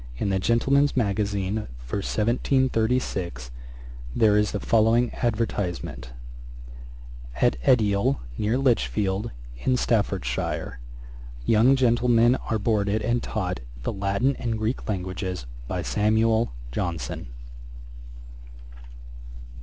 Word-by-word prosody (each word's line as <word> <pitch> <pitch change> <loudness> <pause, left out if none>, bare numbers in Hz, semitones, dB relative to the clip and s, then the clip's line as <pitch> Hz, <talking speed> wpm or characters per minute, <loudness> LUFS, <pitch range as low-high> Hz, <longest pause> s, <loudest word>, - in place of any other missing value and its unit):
In 100 - -1
the 95 -1 +1
Gentleman's 135 +7 +2
Magazine 100 -1 -1
for - - -5
1736, 110 - 0 0.6
there 105 -2 +4
is 105 0 +2
the 100 - -2
following 115 +3 +3
advertisement: 100 - -2 1.3
'At - - +3
Edial, 110 - +3 0.2
near 110 - 0
Lichfield, 110 -5 +1 0.3
in 125 - +1
Staffordshire, 100 - -1 0.7
young 115 +5 +5
gentlemen 120 -1 +4 0.2
are 110 - +1
boarded 105 0 0
and 120 0 +1
taught 90 - -3 0.2
the - - -2
Latin 100 +7 0
and 115 -2 -2
Greek 110 +3 -3
languages, 95 - -3 0.2
by - - -3
SAMUEL 110 +2 +2 0.2
JOHNSON.' 85 -3 -3
110 Hz, 95 wpm, -25 LUFS, 100-120 Hz, 1.3 s, young